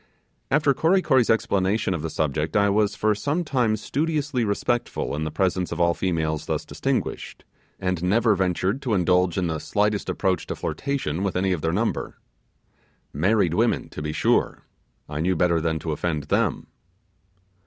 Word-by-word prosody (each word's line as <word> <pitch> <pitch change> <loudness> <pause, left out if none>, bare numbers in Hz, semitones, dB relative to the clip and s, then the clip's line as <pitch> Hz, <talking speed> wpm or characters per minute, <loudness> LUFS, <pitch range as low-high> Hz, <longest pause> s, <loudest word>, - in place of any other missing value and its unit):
After 145 0 +3
Kory 180 +6 +2
Kory's 130 -5 +3
explanation 100 -3 +1
of 85 - -3
the 80 - -3
subject, 75 +2 -1
I 100 0 +3
was 105 0 +1
for 110 0 +2
some 145 - -1
time 125 -8 +1
studiously 145 +1 -1
respectful 115 - -1
in 75 +1 -2
the 80 - -3
presence 90 0 0
of 85 - -4
all 85 0 +3
females 80 -4 -2
thus - - -2
distinguished, - - -3 0.3
and 90 -2 -1
never 110 +5 +3
ventured 95 +5 0
to 120 -6 0
indulge 90 -1 +2
in 90 - +1
the 80 -2 -2
slightest 105 +3 0
approach 95 -3 -1
to - - -3
flirtation 135 - -3
with 100 -1 -1
any 95 +1 +1
of 90 -4 -1
their 80 - 0
number. 110 +6 -1 1.0
Married 90 +3 +2
women, 115 +5 +1
to - - -7
be 75 0 -3
sure! - - +1 0.4
I 75 0 -5
knew 90 +3 +1
better 85 -1 +2
than 80 0 0
to 80 +1 -4
offend 75 0 -2
them. 75 - 0
95 Hz, 170 wpm, -24 LUFS, 85-115 Hz, 1.0 s, After